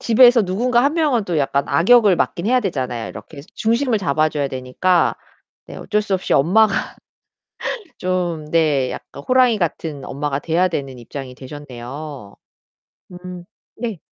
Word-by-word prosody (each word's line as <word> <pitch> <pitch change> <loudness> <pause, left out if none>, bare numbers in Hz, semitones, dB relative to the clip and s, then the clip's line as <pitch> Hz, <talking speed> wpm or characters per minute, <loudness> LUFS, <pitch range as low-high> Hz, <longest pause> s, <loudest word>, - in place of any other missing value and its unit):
집에서 240 0 +6
누군가 240 +6 +1
1 290 +3 +2
명은 285 -10 +1
또 170 -5 -1
약간 140 0 +1
악역을 205 0 +5
맡긴 170 +4 -1
해야 250 +1 +3
되잖아요. 130 - -3
이렇게 145 -3 -10
중심을 230 +1 +1
잡아줘야 150 -3 0
되니까. 130 +8 +1 0.5
네. - - -9
어쩔 210 -1 -1
수 200 -2 -1
없이 185 - -2
엄마가 195 +8 +4 1.2
좀 180 -4 -2
네. 150 -6 +2
약간 140 - -9
호랑이 255 -3 +4
같은 160 -5 -3
엄마가 140 0 -3
돼야 170 +4 +1
되는 135 -6 -4
입장이 130 +2 -8
되셨네요. 135 -3 -9 0.8
음. 180 0 -9 0.3
네. 225 -6 -4
170 Hz, 295 characters per minute, -20 LUFS, 140-220 Hz, 1.2 s, 집에서